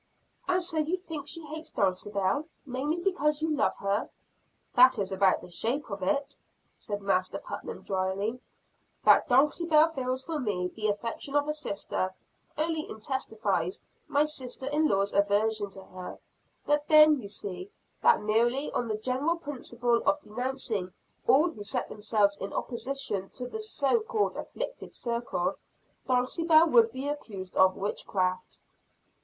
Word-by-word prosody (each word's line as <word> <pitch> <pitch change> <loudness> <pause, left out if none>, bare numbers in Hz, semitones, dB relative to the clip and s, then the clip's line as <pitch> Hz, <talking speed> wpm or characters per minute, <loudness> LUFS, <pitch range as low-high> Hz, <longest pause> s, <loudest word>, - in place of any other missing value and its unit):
"And 365 -1 +2
so 335 -3 -3
you 315 +4 +1
think 320 -6 -7
she 330 +1 -4
hates 315 +2 -7
Dulcibel, 200 +6 0 0.2
mainly 290 +6 -2
because 300 -6 +1
you 315 -1 +1
love 280 - +1
her?" 200 +2 -1 0.6
"That 255 0 +7
is 195 -2 -2
about 190 0 +3
the - - -12
shape 235 - -2
of 200 0 -4
it," 280 +10 0 0.4
said 205 -2 -5
Master 185 -2 +1
Putnam - - -7
drily. 195 +5 -1 0.7
"That - - +6
Dulcibel 305 +4 +4
feels 260 -1 -2
for 320 0 -3
me 190 -8 -1
the 215 +2 -3
affection 230 +7 -3
of 290 0 +3
a 300 - 0
sister, 200 -9 -3 0.4
only 315 0 -1
intensifies 215 -6 -2 0.3
my 290 +1 +3
sister 260 -4 -6
in 300 +3 +2
law's 200 -2 +1
aversion 205 +1 +2
to 190 0 -11
her. 185 -1 -8 0.5
But 295 0 +1
then, 305 -2 +7
you 205 - -7
see, 200 - -6 0.3
that - - +5
merely 240 +6 +2
on 240 - -1
the 215 -1 -1
general 260 +9 0
principle 245 -6 -1
of 295 +1 +4
denouncing 240 -6 -3 0.4
all 310 +6 +5
who 210 - -9
set 200 - -3
themselves 210 -1 +1
in 195 - -4
opposition 235 -6 -3
to 250 -1 -5
the 440 - -6
so 430 -4 +1
called 435 -1 -1
afflicted - - -6
circle, 235 -7 -2 0.5
Dulcibel 315 +6 +4
would 460 -1 +6
be 265 +2 -4
accused 200 -11 -5
of 190 0 +5
witchcraft." 185 -2 -2
250 Hz, 150 wpm, -29 LUFS, 200-300 Hz, 0.7 s, That